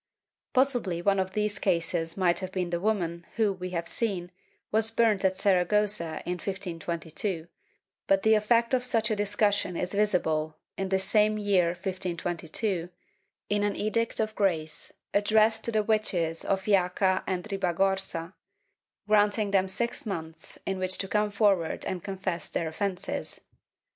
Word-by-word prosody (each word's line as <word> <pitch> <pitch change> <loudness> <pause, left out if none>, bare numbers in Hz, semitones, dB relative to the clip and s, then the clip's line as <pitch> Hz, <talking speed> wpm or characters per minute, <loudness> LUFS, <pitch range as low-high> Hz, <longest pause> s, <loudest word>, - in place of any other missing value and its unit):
^ - - -59
Possibly 245 -10 +2
one 195 0 +3
of 190 0 -1
these 210 -1 -1
cases 170 -2 0
may 180 -2 +4
have 185 -1 -5
been 180 -2 -2
the 170 - 0
woman 175 -4 -1
who, 215 -3 +2
we 185 -1 -6
have 170 -2 -3
seen, 185 -6 -2 0.4
was 220 +1 +3
burnt 225 -3 +2
at 190 -1 +2
Saragossa 195 -3 +1
in 180 0 -2
1522, 170 -1 -3 0.6
but 195 0 +3
the 220 - +5
effect 230 +3 +3
of 250 -1 +3
such 225 -3 +1
a - - +2
discussion 205 -3 +1
is 180 +1 -2
visible, 160 -7 +1 0.2
in 195 -1 -3
this 190 0 +2
same 215 +2 +3
year 200 -4 +3
1522, 175 0 -3 0.6
in 205 0 +1
an 205 -1 0
Edict 230 +2 0
of 215 -1 0
Grace 165 -7 0 0.2
addressed 220 +2 +3
to 235 - 0
the 215 -1 +2
witches 180 -7 0
of 195 -1 0
Jaca 190 -1 +2
and 180 -1 -1
Ribagorza, 190 -2 0 0.7
granting 210 0 +3
them 190 -1 +3
six 235 +4 -2
months 160 -4 -5
in 195 -1 -2
which 185 0 +1
to 195 - -3
come 210 +1 +1
forward 200 -5 +1
and 185 -2 -3
confess 190 -3 -3
their 165 - -2
offences. 185 +3 -3
195 Hz, 155 wpm, -28 LUFS, 175-210 Hz, 0.7 s, the